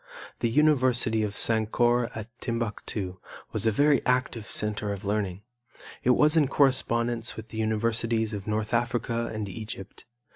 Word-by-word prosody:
The 115 - +1
university 130 -5 +3
of 105 -1 -2
Sankore 115 +2 +3
at 110 -1 -6
Timbuctu 105 -5 -4 0.3
was 115 - -1
a - - +6
very 145 +4 +3
active 125 -3 0
center 105 -1 -2
of 100 +1 -6
learning. 100 -2 -2 0.6
It 125 0 +4
was 150 +2 +4
in 155 -4 +4
correspondence 120 -4 +1
with 110 0 -9
the 110 - -6
universities 110 0 0
of 100 -1 -6
North 110 +1 -2
Africa 115 0 0
and 110 -2 -4
Egypt. 105 0 -8
115 Hz, 145 wpm, -27 LUFS, 105-120 Hz, 0.6 s, a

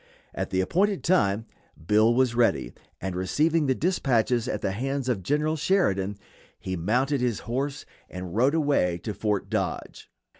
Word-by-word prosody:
At - - -3
the 95 - +1
appointed 195 - +1
time 115 - +2 0.4
Bill 110 +4 +4
was 125 0 +2
ready, 120 0 +1 0.3
and 95 -1 -4
receiving 150 - +1
the 130 - +2
dispatches 125 - +1
at - - -2
the - - -1
hands 135 +5 -2
of 120 -7 0
General 150 - 0
Sheridan 105 - +1 0.4
he 95 - -4
mounted 125 - 0
his 120 -3 -1
horse 135 +4 -3 0.2
and 90 0 -7
rode 130 +7 +3
away 140 - +2
to 105 - -3
Fort 105 0 -1
Dodge. - - -4
120 Hz, 155 wpm, -26 LUFS, 100-145 Hz, 0.4 s, Bill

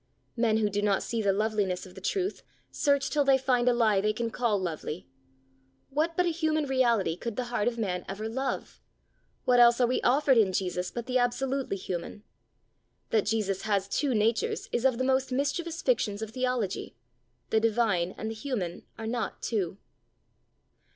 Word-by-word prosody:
Men 230 -2 +2
who 215 -1 +2
do 205 0 -1
not 205 -2 +1
see 230 -1 -2
the 200 -2 +3
loveliness 200 -3 0
of 185 - -13
the 190 - -11
Truth, 385 - -1 0.3
search 280 -2 +1
till 295 -1 +3
they 270 -1 +5
find 250 -2 +2
a - - +5
lie 220 -5 +3
they 215 +1 +1
can 230 +1 -2
call 235 -4 +1
lovely. 170 -2 -4 0.8
What 315 +4 0
but 360 - +3
a - - +2
human 315 -2 0
reality 235 -10 +2
could 230 +4 -5
the 255 - -1
heart 220 -2 +1
of 240 -1 0
man 180 -5 -2
ever 205 +3 -4
love! 265 +4 -4 0.6
what 250 -1 +4
else 235 0 +7
are 250 - +5
we 250 +2 0
offered 265 -1 +4
in 195 -4 +3
Jesus 180 -1 -1
but 235 +3 -5
the 255 0 +1
absolutely 255 -2 0
human? 185 +2 -5 0.9
That 215 -2 +2
Jesus 205 -3 0
has 200 -3 0
two 270 +4 0
natures 220 +2 +1
is 240 - -1
of 260 -3 +3
the 255 - 0
most 265 0 +1
mischievous 330 +6 -1
fictions 220 - +1
of 220 - -6
theology. 250 -5 -2 0.6
The 220 - +4
divine 215 -6 +1
and 220 - -4
the - - -4
human 220 -8 -4
are 225 - -6
not 235 +1 -3
two. 195 -5 -1
230 Hz, 185 wpm, -28 LUFS, 205-260 Hz, 0.9 s, else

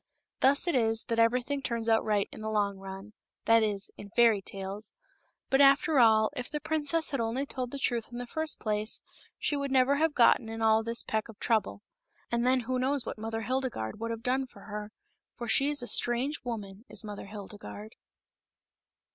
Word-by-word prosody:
Thus 280 +6 +6
it 345 - +1
is 225 -3 +2
that 230 0 0
everything 250 +5 +1
turns 230 -3 -3
out 225 -1 +3
right 210 -2 0
in - - -10
the 215 - -3
long 205 -2 0
run 195 +2 -9 0.2
— - - -60
that 230 0 +5
is 205 -2 -1
in 205 - -10
fairy 225 -2 +4
tales. 195 +2 -6 0.6
But, 270 +1 +4
after 280 +1 +5
all, 220 -2 +5
if 250 - -5
the 300 - -3
princess 315 +1 0
had 275 - -2
only 230 +4 -1
told 255 -3 -4
the 280 - -6
truth 240 -4 -2
in 240 - -7
the 245 - -5
first 315 +5 -2
place, 215 0 0 0.3
she 295 - -1
would 280 -1 -2
never 265 +1 +3
have 315 0 +1
gotten 235 -1 +4
in 225 0 -6
all 220 0 +4
this 230 +1 -1
peck 220 +1 -2
of 220 - -12
trouble. 220 -2 -1 0.5
And 235 +1 +1
then 255 0 +3
who 255 +2 -2
knows 265 0 0
what - - -6
Mother 225 +1 -4
Hildegarde 245 - -3
would 230 +1 -3
have 230 0 -5
done 260 +2 0
for 200 - -16
her, 210 +1 -7 0.4
for 235 - -6
she 275 +5 +3
is 290 -3 +2
a - - -4
strange 250 +7 +2
woman, 210 -4 -6
is - - -3
Mother 205 -2 -8
Hildegarde. 210 +1 -9
230 Hz, 205 wpm, -29 LUFS, 215-260 Hz, 0.6 s, Thus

